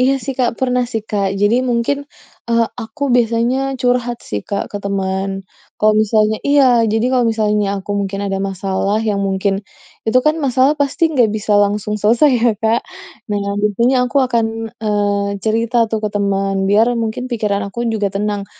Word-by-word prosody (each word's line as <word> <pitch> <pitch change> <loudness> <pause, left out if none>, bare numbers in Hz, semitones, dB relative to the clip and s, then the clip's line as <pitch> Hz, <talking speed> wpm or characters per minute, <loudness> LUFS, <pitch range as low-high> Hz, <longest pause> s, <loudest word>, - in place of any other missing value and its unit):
Iya 260 +2 +3
sih, 270 -1 -3
Kak, 245 -2 +1
pernah 250 -1 +1
sih, 225 - -2
Kak. 200 -2 0
Jadi, 205 +3 +3
mungkin, 275 +5 -1 0.4
eee, 230 0 +2
aku 235 +6 -8
biasanya 235 +1 +2 0.2
curhat 245 -1 0
sih, 105 - -4
Kak, 200 - -3
ke 205 - -4
teman. 195 0 -2 0.4
Kalau 215 0 +4
misalnya 215 0 +1
iya. 285 -1 +5 0.3
Jadi, 225 +1 +1
kalau 250 -2 +3
misalnya 210 -2 +1 0.2
aku 205 - -8
mungkin 195 0 -3
ada 195 -1 -2
masalah 195 +2 -1
yang 210 -2 0
mungkin 195 +1 0 0.5
itu 225 +3 +4
kan 305 - +4
masalah 265 0 +3
pasti 285 +4 -1
nggak 245 -5 +3
bisa 210 0 -2
langsung 210 +1 -1
selesai 235 +8 +4
ya, 235 - +4
Kak? 225 +2 +2 0.5
Nah, 205 -1 -1 0.2
tentunya 235 +5 +2
aku 250 - -5
akan, 235 -2 +1 0.4
eee, 205 -1 0 0.2
cerita 225 +2 0
tuh 220 - 0
ke - - +1
teman, 195 -1 0
biar 215 +3 +4
mungkin 230 +2 -3
pikiran 210 -4 -1
aku 235 +5 -4
juga 210 -2 0
tenang. 205 0 -2
220 Hz, 170 wpm, -17 LUFS, 200-240 Hz, 0.5 s, iya